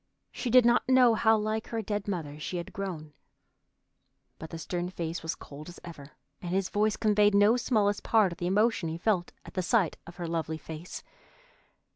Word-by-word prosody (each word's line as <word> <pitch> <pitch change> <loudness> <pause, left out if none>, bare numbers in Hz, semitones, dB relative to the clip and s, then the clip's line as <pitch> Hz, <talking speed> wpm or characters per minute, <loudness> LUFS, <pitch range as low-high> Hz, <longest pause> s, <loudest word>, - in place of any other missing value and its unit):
She 250 - -4
did 250 0 +6
not 240 +2 +3
know 255 -2 +6
how 220 0 +4
like 215 +1 -2
her 225 -1 -3
dead 205 0 -3
mother 155 -7 -4
she 175 +4 -4
had 170 - -6
grown. 170 -6 -5 1.3
But 160 - -8
the 165 - -6
stern 175 +2 -3
face 170 -2 -4
was 160 - -3
cold 150 +3 -11
as 175 - -11
ever, 150 -4 -11 0.3
and 175 - -5
his 195 -1 0
voice 210 +1 +1
conveyed 210 -2 +3
no 205 +3 +5
smallest 215 -4 +1
part 215 -5 +3
of 170 - -9
the 175 - -1
emotion 205 -2 +2
he 160 - -4
felt 180 -1 0
at 185 - -4
sight 190 -4 +1
of 170 - -10
her 175 - -5
lovely 160 -1 -2
face. 160 +3 -8
190 Hz, 190 wpm, -29 LUFS, 165-215 Hz, 1.3 s, did